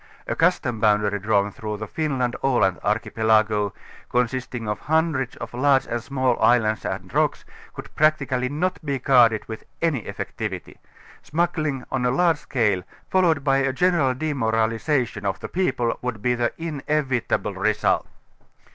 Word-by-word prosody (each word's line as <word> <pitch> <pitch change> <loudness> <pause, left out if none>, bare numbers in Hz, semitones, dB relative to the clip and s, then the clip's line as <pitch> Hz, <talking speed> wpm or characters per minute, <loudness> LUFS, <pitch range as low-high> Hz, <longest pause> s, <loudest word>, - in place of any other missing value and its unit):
A - - -2
custom 120 -3 +1
boundary 105 -1 +2
drawn 100 0 +1
through 105 +1 -5
the 110 - -5
Finland 130 -2 -1
ŌĆö - - -27
Aland 95 -6 +2
archipelago, 110 -1 +1 0.4
consisting 125 -1 -1
of 105 - -2
hun 160 +2 +1
dreds 130 -4 -3
of - - -8
large 135 +2 +3
and 120 0 -3
small 130 0 0
islands 110 -3 +3
and - - -5
rocks, - - +1 0.3
could - - -9
practically 140 -5 +1
^_Jiot 180 +6 -1
be 140 -3 -1
guarded 120 -4 +4
with 110 -1 -7 0.2
any 160 -8 0
effectivity; - - -5 0.4
smuggling 155 -5 -1
on 130 -2 -1
a 125 - +2
large 165 +4 +2
I - - -21
fscale, 105 -8 +1 0.3
followed 170 -6 +3
by 135 -1 +3
a 135 0 +1
general 150 -3 +2
demoralization 115 -3 0
of 95 -1 -2
the - - -6
people, 135 -10 0
I - - -4
/would 125 -4 -3
be 125 - +2
the 120 -1 0
inevitable 150 -5 -1
result. - - +1
125 Hz, 155 wpm, -23 LUFS, 110-145 Hz, 0.4 s, guarded